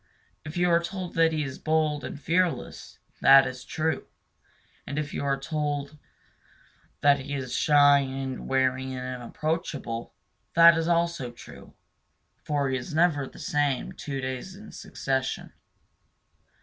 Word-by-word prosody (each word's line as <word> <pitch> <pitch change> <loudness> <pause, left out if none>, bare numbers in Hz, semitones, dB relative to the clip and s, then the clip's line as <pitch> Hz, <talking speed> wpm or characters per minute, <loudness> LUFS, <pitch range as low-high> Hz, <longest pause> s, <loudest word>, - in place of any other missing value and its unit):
If 155 +3 -7
you 175 - +3
hear 170 -1 +4
that 170 -2 0
he 155 -1 -1
is 135 -2 -6
bold 155 -2 0
and - - -6
fearless, 170 +4 -1 0.2
that 135 0 +8
is 130 -1 -6
true; 160 0 -2 0.8
and 145 - -4
if 150 -1 -3
you - - -3
are 135 -1 0
told 145 0 -3 1.0
that 140 -1 +5
he 140 +2 -5
is 130 -3 -4
shy 145 0 +5
and 135 -1 -4
wary 130 0 0
and 125 0 -5 0.2
inapproachable, 135 -4 -3 0.4
that 170 0 +8
is 165 0 -1
also 170 -6 0
true. 120 - -14 0.7
For 145 -2 0
he 130 - 0
is 130 +4 -6
never 155 -5 +2
the - - -15
same 145 -3 -1
two 140 -2 -5
days 130 +8 -5
in 210 +2 -12
succession. 130 -1 -3
145 Hz, 140 wpm, -27 LUFS, 135-160 Hz, 1.0 s, that